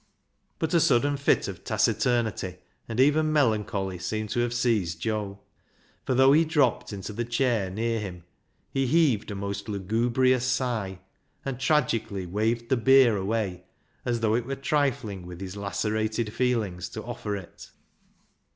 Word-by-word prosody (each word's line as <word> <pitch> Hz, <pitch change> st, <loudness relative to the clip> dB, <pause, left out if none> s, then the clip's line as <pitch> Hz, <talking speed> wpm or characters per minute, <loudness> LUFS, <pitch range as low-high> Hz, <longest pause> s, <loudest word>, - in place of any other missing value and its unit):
But 160 Hz, -, -2 dB
a 170 Hz, -, +5 dB
sudden 145 Hz, -2 st, +3 dB
fit 140 Hz, 0 st, +2 dB
of -, -, -7 dB
taciturnity, 110 Hz, -7 st, 0 dB, 0.3 s
and 115 Hz, +1 st, -3 dB
even 155 Hz, +3 st, +4 dB
melancholy, 105 Hz, -, 0 dB
seemed 110 Hz, +3 st, -3 dB
to -, -, 0 dB
have 120 Hz, 0 st, +1 dB
seized 115 Hz, -8 st, 0 dB
Joe. 105 Hz, -3 st, -2 dB, 0.7 s
For 130 Hz, -, +1 dB
though 130 Hz, +2 st, +6 dB
he 160 Hz, +3 st, +5 dB
dropped 140 Hz, -7 st, +1 dB
into 100 Hz, +1 st, -6 dB
the 120 Hz, +3 st, -2 dB
chair 120 Hz, -4 st, 0 dB
near 115 Hz, +4 st, -1 dB
him, 90 Hz, -5 st, -7 dB, 0.5 s
he 135 Hz, -1 st, 0 dB
heaved 140 Hz, -8 st, +2 dB
a 100 Hz, -, -4 dB
most 100 Hz, +2 st, -4 dB
lugubrious 120 Hz, +6 st, +1 dB
sigh, 120 Hz, -7 st, -1 dB, 0.4 s
and 135 Hz, -2 st, -3 dB
tragically 115 Hz, -9 st, 0 dB
waved 110 Hz, +6 st, -1 dB
the 130 Hz, -, +3 dB
beer 130 Hz, -1 st, +6 dB
away, 100 Hz, -2 st, -2 dB, 0.4 s
as 120 Hz, -2 st, -1 dB
though 110 Hz, -1 st, +2 dB
it 120 Hz, +1 st, 0 dB
were 135 Hz, -, -2 dB
trifling 135 Hz, -10 st, -1 dB
with 90 Hz, -1 st, -9 dB
his 95 Hz, 0 st, -6 dB
lacerated 110 Hz, +2 st, -2 dB
feelings 105 Hz, -8 st, -1 dB
to 110 Hz, -, -7 dB
offer 115 Hz, -4 st, -4 dB
it. 95 Hz, -4 st, -10 dB
115 Hz, 150 wpm, -27 LUFS, 100-130 Hz, 0.7 s, though